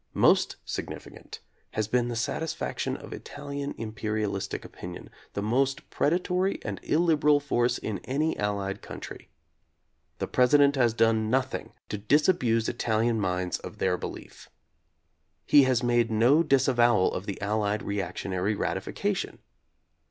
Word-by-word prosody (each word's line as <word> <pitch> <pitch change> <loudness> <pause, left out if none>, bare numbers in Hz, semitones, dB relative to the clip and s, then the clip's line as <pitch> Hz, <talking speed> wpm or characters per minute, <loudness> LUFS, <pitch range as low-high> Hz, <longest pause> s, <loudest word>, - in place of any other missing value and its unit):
Most - - +4
significant - - -7 0.3
has 110 -1 -1
been 120 +2 +1
the 120 - -3
satis 155 +7 -2
faction - - -3
of - - -9
Italian 145 0 -6
imperialistic 110 -2 -3
opinion, 90 0 -9 0.2
the 100 - -3
most 135 +5 0
predatory 180 +4 +1
and - - -4
illiberal 150 -3 +3
force 120 -4 +1
in 105 -3 -4
any 150 +5 0
Allied 100 -1 -2
country. - - -9 0.9
The - - -2
President 140 +3 +4
has 120 -4 +2
done 110 -1 +2
nothing 130 +2 -1 0.2
to 105 - -3
disabuse 125 - +2
Ital 110 -2 0
ian 115 -1 +1
minds 90 -1 -1
of - - -9
their - - +1
belief. - - -8 1.0
He 145 -2 +6
has 130 -1 +2
made 120 -1 +2
no 120 +8 +4
dis 135 -5 +3
avowal 120 -6 +3
of 95 - -5
the 100 - -4
Allied 105 +1 -1
reactionary 100 0 -2
ratification. - - -2
120 Hz, 135 wpm, -27 LUFS, 105-140 Hz, 1.0 s, He